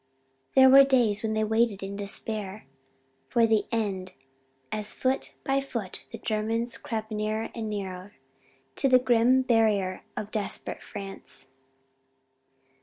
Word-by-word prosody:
There 265 Hz, 0 st, +8 dB
were 270 Hz, +1 st, +9 dB
days 240 Hz, -6 st, +3 dB
when 220 Hz, -1 st, -1 dB
they 215 Hz, -, +1 dB
waited 220 Hz, -2 st, +1 dB
in 195 Hz, +1 st, -5 dB
despair 205 Hz, 0 st, -4 dB, 0.6 s
for 235 Hz, -1 st, +4 dB
the 220 Hz, -2 st, +2 dB
end 195 Hz, -5 st, -2 dB, 0.6 s
as 210 Hz, 0 st, -2 dB
foot 260 Hz, +1 st, -1 dB
by 275 Hz, 0 st, +1 dB
foot 230 Hz, -8 st, -5 dB
the -, -, -6 dB
Germans 225 Hz, +2 st, -1 dB
crept 220 Hz, -1 st, -4 dB
nearer 215 Hz, +1 st, -2 dB
and 225 Hz, -2 st, -4 dB
nearer 195 Hz, -1 st, -5 dB, 0.6 s
to 270 Hz, -, +3 dB
the 255 Hz, -, +7 dB
grim 250 Hz, +1 st, +4 dB
barrier 215 Hz, -6 st, +2 dB, 0.2 s
of 210 Hz, 0 st, -4 dB
desperate 210 Hz, -2 st, -3 dB
France. 195 Hz, -8 st, -8 dB
220 Hz, 130 wpm, -27 LUFS, 205-235 Hz, 0.6 s, were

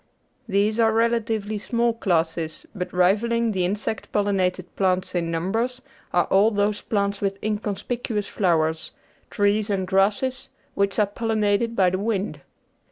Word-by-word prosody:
These 210 Hz, +3 st, +1 dB
are 225 Hz, -1 st, +4 dB
relatively 225 Hz, -2 st, 0 dB
small 235 Hz, +2 st, +1 dB
classes, 165 Hz, -6 st, -1 dB
but 180 Hz, -3 st, -4 dB
rivalling 220 Hz, +6 st, +2 dB
the 190 Hz, -3 st, 0 dB
insect 205 Hz, +3 st, -3 dB
pollin 205 Hz, -1 st, +1 dB
ated 180 Hz, -1 st, -1 dB
plants 185 Hz, -1 st, 0 dB
in 170 Hz, -2 st, -1 dB
numbers 225 Hz, +10 st, -1 dB, 0.3 s
are 175 Hz, -, +3 dB
all 200 Hz, +3 st, +4 dB
those 205 Hz, -1 st, 0 dB
plants 200 Hz, -1 st, -1 dB
with 195 Hz, -1 st, -1 dB
inconspicuous 210 Hz, +1 st, -2 dB
flowers, 160 Hz, -5 st, 0 dB, 0.4 s
trees 205 Hz, +1 st, +1 dB
and 195 Hz, -2 st, 0 dB
grasses, 210 Hz, +8 st, +1 dB, 0.2 s
which 200 Hz, -1 st, 0 dB
are 210 Hz, -, +4 dB
pollinated 220 Hz, +1 st, 0 dB
by 185 Hz, -4 st, +3 dB
the 185 Hz, -, -1 dB
wind. 205 Hz, -1 st, -2 dB
205 Hz, 140 wpm, -24 LUFS, 185-220 Hz, 0.4 s, are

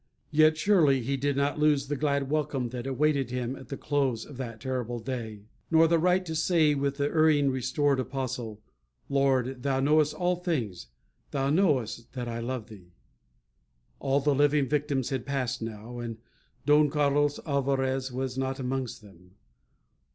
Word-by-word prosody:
Yet 155 Hz, 0 st, +5 dB
surely 160 Hz, -8 st, +4 dB
he 135 Hz, +4 st, -1 dB
did 140 Hz, +1 st, -1 dB
not 140 Hz, +1 st, 0 dB
lose 150 Hz, -2 st, +3 dB
the 145 Hz, -, -1 dB
glad 140 Hz, -1 st, 0 dB
welcome 140 Hz, -4 st, -1 dB
that 125 Hz, +1 st, -5 dB
awaited 140 Hz, -1 st, +1 dB
him 125 Hz, +1 st, -3 dB
at 130 Hz, -, -12 dB
the 135 Hz, -, -5 dB
close 135 Hz, -6 st, -1 dB
of 140 Hz, -, -11 dB
that 115 Hz, -4 st, -6 dB
terrible 125 Hz, -1 st, -3 dB
day; 115 Hz, -4 st, -5 dB, 0.3 s
nor 165 Hz, 0 st, +5 dB
the 165 Hz, 0 st, +3 dB
right 180 Hz, +2 st, +2 dB
to 160 Hz, -, -4 dB
say, 160 Hz, -1 st, +3 dB
with 140 Hz, 0 st, -1 dB
the 140 Hz, -, 0 dB
erring 150 Hz, -2 st, +3 dB
restored 130 Hz, +2 st, +1 dB
apostle, 125 Hz, -5 st, -4 dB, 0.5 s
"Lord, 135 Hz, -2 st, +1 dB
thou 135 Hz, 0 st, 0 dB
knowest 150 Hz, +2 st, +3 dB
all 180 Hz, 0 st, 0 dB
things; 120 Hz, -, -3 dB, 0.4 s
thou 135 Hz, -1 st, 0 dB
knowest 135 Hz, -, +1 dB
that 125 Hz, -2 st, -4 dB
I 115 Hz, 0 st, -4 dB
love 120 Hz, -1 st, -4 dB
thee." 95 Hz, -6 st, -14 dB, 1.1 s
All 135 Hz, 0 st, +1 dB
the 145 Hz, +1 st, +2 dB
living 145 Hz, 0 st, +3 dB
victims 140 Hz, -2 st, -1 dB
had 130 Hz, -3 st, -2 dB
passed 130 Hz, -3 st, -2 dB
now. 115 Hz, +2 st, -7 dB
And 115 Hz, -2 st, -5 dB, 0.5 s
Don 150 Hz, 0 st, +5 dB
Carlos 145 Hz, 0 st, +1 dB
Alvarez 135 Hz, -2 st, 0 dB
was 130 Hz, 0 st, -3 dB
not 135 Hz, 0 st, -2 dB
amongst 130 Hz, -3 st, -3 dB
them. 90 Hz, -2 st, -18 dB
135 Hz, 165 wpm, -28 LUFS, 125-145 Hz, 1.1 s, Yet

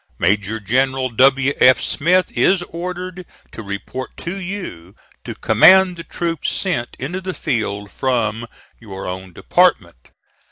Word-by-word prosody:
Major 100 Hz, +4 st, 0 dB
General 130 Hz, +4 st, 0 dB
W. 135 Hz, +3 st, +3 dB
F. 130 Hz, 0 st, +6 dB
Smith 180 Hz, +5 st, +1 dB
is 185 Hz, -2 st, +3 dB
ordered 180 Hz, +2 st, -6 dB, 0.3 s
to -, -, -8 dB
report 100 Hz, +5 st, -7 dB
to 170 Hz, +3 st, -5 dB
you, 175 Hz, -, -7 dB, 0.3 s
to -, -, -7 dB
command 185 Hz, -, +5 dB
the 165 Hz, -, -7 dB
troops 165 Hz, -2 st, -3 dB
sent 150 Hz, -11 st, -2 dB
into 175 Hz, +9 st, -5 dB
the 185 Hz, -1 st, -5 dB
field 105 Hz, -4 st, -3 dB
from 115 Hz, -3 st, -1 dB, 0.3 s
your 95 Hz, -4 st, -8 dB
own 95 Hz, 0 st, -6 dB
department. 60 Hz, -6 st, +1 dB
130 Hz, 130 wpm, -19 LUFS, 105-175 Hz, 0.3 s, F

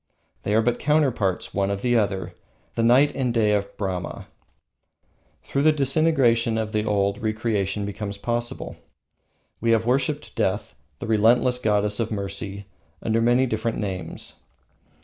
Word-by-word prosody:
They 105 Hz, -, 0 dB
are 110 Hz, -, +4 dB
but 120 Hz, +1 st, 0 dB
counterparts 135 Hz, -, +1 dB
one 100 Hz, 0 st, 0 dB
of 100 Hz, 0 st, -3 dB
the 120 Hz, -1 st, +2 dB
other, 95 Hz, -5 st, 0 dB, 0.4 s
The -, -, -1 dB
Night 130 Hz, +5 st, +5 dB
and 130 Hz, -3 st, 0 dB
Day 110 Hz, -3 st, +2 dB
of 100 Hz, -1 st, -2 dB
Brahma. 95 Hz, -3 st, -4 dB, 1.1 s
Through 140 Hz, -, -1 dB
the 155 Hz, +2 st, +6 dB
disintegration 135 Hz, -6 st, +2 dB
of 110 Hz, -1 st, -2 dB
the 105 Hz, -1 st, 0 dB
old, 100 Hz, 0 st, +1 dB
re 110 Hz, -2 st, -1 dB
creation 105 Hz, -3 st, -1 dB
becomes 100 Hz, 0 st, -5 dB
possible. 120 Hz, +3 st, -3 dB, 0.8 s
We 115 Hz, -, 0 dB
have 115 Hz, 0 st, +2 dB
worshipped 135 Hz, +4 st, 0 dB
Death, 95 Hz, +3 st, -1 dB, 0.2 s
the -, -, -6 dB
relentless 115 Hz, +3 st, +3 dB
goddess 105 Hz, -2 st, +1 dB
of 115 Hz, -1 st, 0 dB
mercy, 100 Hz, -1 st, -4 dB, 0.4 s
under 115 Hz, +1 st, +1 dB
many 120 Hz, +3 st, +4 dB
different 115 Hz, -1 st, -2 dB
names. 95 Hz, -3 st, -5 dB
110 Hz, 150 wpm, -24 LUFS, 100-120 Hz, 1.1 s, the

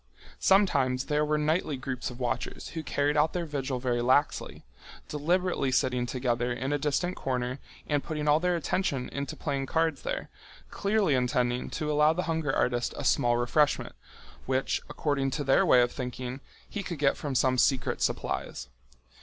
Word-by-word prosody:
Sometimes 140 Hz, -10 st, +3 dB
there 150 Hz, 0 st, +1 dB
were 150 Hz, 0 st, +1 dB
nightly 155 Hz, -1 st, 0 dB
groups 130 Hz, -1 st, -4 dB
of 125 Hz, 0 st, -10 dB
watchers 125 Hz, -2 st, -3 dB
who 165 Hz, -, -5 dB
carried 145 Hz, 0 st, 0 dB
out 150 Hz, +1 st, +3 dB
their 175 Hz, -1 st, -2 dB
vigil 140 Hz, -4 st, -3 dB
very 125 Hz, -1 st, 0 dB
laxly, 130 Hz, +4 st, +1 dB, 0.5 s
deliberately 170 Hz, -1 st, 0 dB
sitting 125 Hz, -1 st, +1 dB
together 120 Hz, -1 st, -1 dB
in 130 Hz, +4 st, -2 dB
a 145 Hz, -, 0 dB
distant 150 Hz, +5 st, 0 dB
corner 125 Hz, 0 st, -2 dB, 0.3 s
and 145 Hz, -2 st, 0 dB
putting 150 Hz, -2 st, -3 dB
all 150 Hz, +1 st, +5 dB
their 180 Hz, +1 st, +1 dB
attention 150 Hz, -5 st, -1 dB
into 140 Hz, -1 st, -4 dB
playing 140 Hz, -3 st, -2 dB
cards 160 Hz, +2 st, 0 dB
there, -, -, -4 dB, 0.4 s
clearly 200 Hz, -6 st, +1 dB
intending 125 Hz, -1 st, 0 dB
to 150 Hz, -1 st, -2 dB
allow 150 Hz, +1 st, +4 dB
the 180 Hz, +2 st, -2 dB
hunger 160 Hz, -4 st, -1 dB
artist 120 Hz, -2 st, 0 dB
a -, -, -4 dB
small 120 Hz, 0 st, +3 dB
refreshment, 140 Hz, +5 st, +1 dB, 0.5 s
which, 130 Hz, 0 st, 0 dB
according 140 Hz, -3 st, 0 dB
to 135 Hz, +2 st, -2 dB
their 135 Hz, -1 st, +3 dB
way 125 Hz, -, +7 dB
of 120 Hz, -, -1 dB
thinking, 125 Hz, 0 st, -5 dB, 0.3 s
he 205 Hz, -, -4 dB
could 175 Hz, -4 st, -5 dB
get 140 Hz, -1 st, +2 dB
from 140 Hz, -3 st, -4 dB
some 130 Hz, 0 st, +3 dB
secret 130 Hz, -1 st, +2 dB
supplies. -, -, -2 dB
140 Hz, 170 wpm, -28 LUFS, 125-155 Hz, 0.5 s, way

